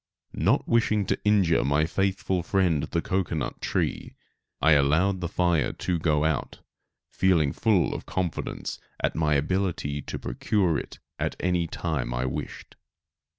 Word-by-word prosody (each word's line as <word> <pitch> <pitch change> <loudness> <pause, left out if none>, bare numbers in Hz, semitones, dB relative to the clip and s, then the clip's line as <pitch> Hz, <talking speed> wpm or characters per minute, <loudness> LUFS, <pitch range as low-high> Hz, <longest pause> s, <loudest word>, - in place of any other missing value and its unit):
Not - - +1
wishing 110 -3 +2
to - - -1
injure 95 -9 +3
my 70 +3 +2
faithful 95 0 0
friend 85 -4 +1
the - - -2
cocoanut 90 -5 -2
tree, - - -2 0.4
I 80 - +4
allowed 80 +7 +3
the 85 - -1
fire 85 -2 +1
to 90 -2 -2
go 75 -2 +2
out, 80 -5 -2 0.5
feeling 85 -7 +2
full 105 -6 +1
confidence 90 -3 -4 0.2
in - - +2
my 75 -2 +1
ability 75 -2 -1
to - - -6
procure 85 - 0
it - - -9 0.4
any 90 -2 +1
time 70 -8 -3
I 60 +1 -1
wished. 65 - -6
85 Hz, 135 wpm, -26 LUFS, 75-95 Hz, 0.5 s, I